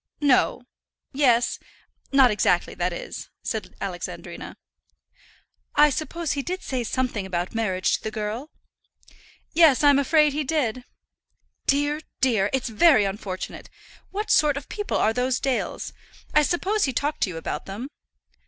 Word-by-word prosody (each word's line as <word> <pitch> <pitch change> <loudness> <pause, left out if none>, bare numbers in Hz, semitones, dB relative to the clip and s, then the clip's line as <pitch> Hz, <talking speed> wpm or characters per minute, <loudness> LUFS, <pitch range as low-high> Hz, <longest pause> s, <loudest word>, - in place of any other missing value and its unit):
"No; 270 -3 +3 0.5
yes; 245 -4 +3 0.5
not 270 -3 +6
exactly, 210 - +1
that - - -1
is," - - -7
said - - -4
Alexandrina. - - -6 1.2
"I 295 0 +6
suppose 325 +3 -3
he 280 - -1
did 365 +6 -4
say 255 -2 -2
something 250 -3 -1
about 175 -1 -3
marriage 190 -5 0
to - - -21
the 220 - -2
girl?" 215 +6 -4 1.0
"Yes, 310 -5 +5
I'm 285 -1 +6
afraid 300 +1 +4
he 300 +1 -1
did." 255 -5 -1 0.8
"Dear, 290 +2 +2 0.2
dear! 220 -6 +2
It's 265 -2 -1
very 225 -1 +5
unfortunate. 195 -1 -5 0.4
What 420 +2 -3
sort 295 -2 +4
of 280 - -7
people 415 -1 -2
are 220 - +2
those 250 +1 0
Dales? 265 -2 -2 0.4
I 300 - +6
suppose 380 +7 +1
he 265 - -2
talked 290 +5 -1
to - - +2
you 170 - -6
about 160 -1 -5
them." 205 +7 -5
265 Hz, 145 wpm, -24 LUFS, 220-300 Hz, 1.2 s, not